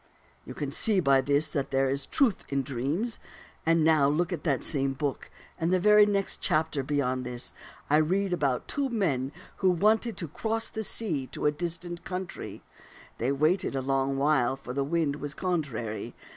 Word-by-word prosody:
" - - -33
You - - -7
can 145 -2 -3
see 205 +6 +1
by 135 -5 +4
this 145 +3 +2
that 140 -2 -2
there 135 0 +2
is 135 +1 -1
truth 250 -9 +2
in 140 -1 0
dreams. 140 - -2 0.5
And 165 -1 +4
now 155 -3 +4
in 150 - +1 0.2
that 140 -6 0
same 135 -3 +2
book, 140 0 -3 0.3
in 165 0 +1
the 185 0 +3
very 210 +2 +6
next 200 -1 0
chapter 155 -2 +1
beyond 130 -2 -1
this, 125 -1 -3 0.3
I 150 - +4
read 185 +5 +1
about 140 -7 0
two 280 -2 -1
men 145 - 0 0.3
who 190 - +3
wanted 215 +6 +2
to 170 - -4
cross 225 +9 -2
the 220 - -4
sea 165 - -2
to - - -5
a 150 - +5
distant 175 +2 -4
country. 185 0 -6 0.6
They 120 +4 +1
waited 155 +3 +1
a 135 - 0
long 135 0 0
while, 135 -3 +2
for 130 -2 -8
the 140 +1 0
wind 150 -1 0
was 145 +1 -5
contrary. 140 - -3
150 Hz, 185 wpm, -28 LUFS, 135-180 Hz, 0.6 s, very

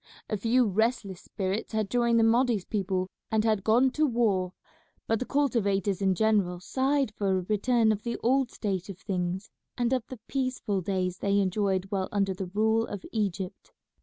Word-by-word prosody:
A - - +2
few 235 +5 +2
restless 210 -2 0
spirits 195 +3 -3
had 215 -2 0
joined 235 -1 +3
the - - +4
Mahdi's 230 -3 +3
people 190 -3 -1 0.2
and 220 -1 +2
had 215 -3 +1
gone 245 +5 +4
to 300 - -4
the - - +2
war; 210 -7 +1 0.5
but 225 -1 +1
the 255 - -4
cultivators 205 -9 +1
in 190 -1 +2
general 200 -4 +2
sighed 265 +5 0
for 195 -2 0
a - - -1
return 220 +3 +2
of 210 -1 -2
the 235 +1 -3
old 260 +1 +3
state 195 -5 -3
of 195 - -7
things, 185 0 -3 0.3
and 240 0 +1
of 255 -3 +1
the 255 - -9
peaceful 255 -7 -1
days 185 -1 -2
they 200 0 +2
enjoyed 190 -1 +1
while 190 -2 -1
under 195 -2 +1
the 190 0 -5
rule 220 +4 +1
of 200 -2 -7
Egypt. 195 -4 -3
210 Hz, 185 wpm, -28 LUFS, 190-235 Hz, 0.5 s, the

